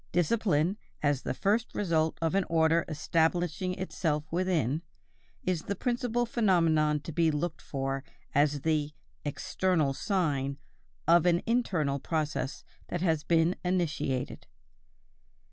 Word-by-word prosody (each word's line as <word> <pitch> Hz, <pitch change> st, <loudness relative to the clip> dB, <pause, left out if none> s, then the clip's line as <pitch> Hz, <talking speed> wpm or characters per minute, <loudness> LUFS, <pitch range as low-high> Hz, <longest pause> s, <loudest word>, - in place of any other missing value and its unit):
Discipline, 175 Hz, 0 st, +2 dB, 0.3 s
as 145 Hz, -3 st, +2 dB
the -, -, -2 dB
first 215 Hz, -, 0 dB
result 160 Hz, -5 st, +1 dB
of 165 Hz, -, +1 dB
an 195 Hz, 0 st, +3 dB
order 165 Hz, 0 st, +3 dB
establishing 170 Hz, +3 st, 0 dB
itself 165 Hz, -5 st, -1 dB
within, 165 Hz, -6 st, +1 dB, 0.6 s
is 180 Hz, -3 st, 0 dB
the 200 Hz, -, -3 dB
principal 240 Hz, +1 st, 0 dB
phenomenon 165 Hz, -10 st, +2 dB
to 165 Hz, -, -7 dB
be 165 Hz, +1 st, +3 dB
looked 155 Hz, +2 st, -2 dB
for 135 Hz, -1 st, -3 dB, 0.3 s
as 145 Hz, 0 st, +2 dB
the 150 Hz, -1 st, 0 dB, 0.3 s
"external 155 Hz, 0 st, 0 dB
sign" 140 Hz, -6 st, 0 dB, 0.5 s
of 170 Hz, +1 st, +5 dB
an 175 Hz, 0 st, +3 dB
internal 175 Hz, -, +1 dB
process 155 Hz, -2 st, -2 dB, 0.2 s
that 175 Hz, -, -3 dB
has 160 Hz, -4 st, +1 dB
been 165 Hz, +1 st, +3 dB
initiated. 160 Hz, -8 st, -1 dB
165 Hz, 120 wpm, -29 LUFS, 150-185 Hz, 0.6 s, of